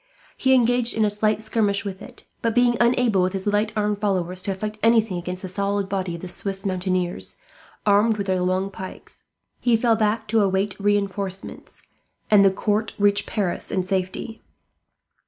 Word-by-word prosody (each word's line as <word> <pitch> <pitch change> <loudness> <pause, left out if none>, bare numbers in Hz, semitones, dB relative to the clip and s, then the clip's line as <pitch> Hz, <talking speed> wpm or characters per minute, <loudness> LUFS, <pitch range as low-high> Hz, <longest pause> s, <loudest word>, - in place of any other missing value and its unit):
He 265 0 +3
engaged 245 -1 +2
in 220 - +3
a 205 - +1
slight 215 +1 0
skirmish 210 -2 0
with 190 -2 -5
it; - - -12 0.2
but 230 -1 0
being 245 -1 +4
unable, 235 -4 +3
with 185 +1 0
his 190 -1 -4
lightly 210 +1 0
armed 210 -1 0
followers, 185 -3 -1
to 195 - -2
effect 215 +3 -5
anything 225 -4 +3
against 180 +2 -6
the - - -3
solid 200 +1 -1
body 190 -3 -2
of 170 - -9
the 185 - -6
Swiss 195 +2 -3
mountaineers, 185 -1 -2 0.5
armed 210 +2 +4
with 200 - -2
their 185 -2 0
long 185 +2 0
pikes, 190 -1 -10 0.3
he 240 -2 +3
fell 230 0 +3
back 220 +1 0
to 225 0 +3
await 195 0 0
reinforcements; 200 -2 -3 0.5
and 205 -2 +7
the 195 - +6
court 210 +3 -1
reached 205 -1 +2
Paris 200 -5 -2
in 185 - 0
safety. 190 +4 -3
200 Hz, 175 wpm, -23 LUFS, 190-220 Hz, 0.5 s, and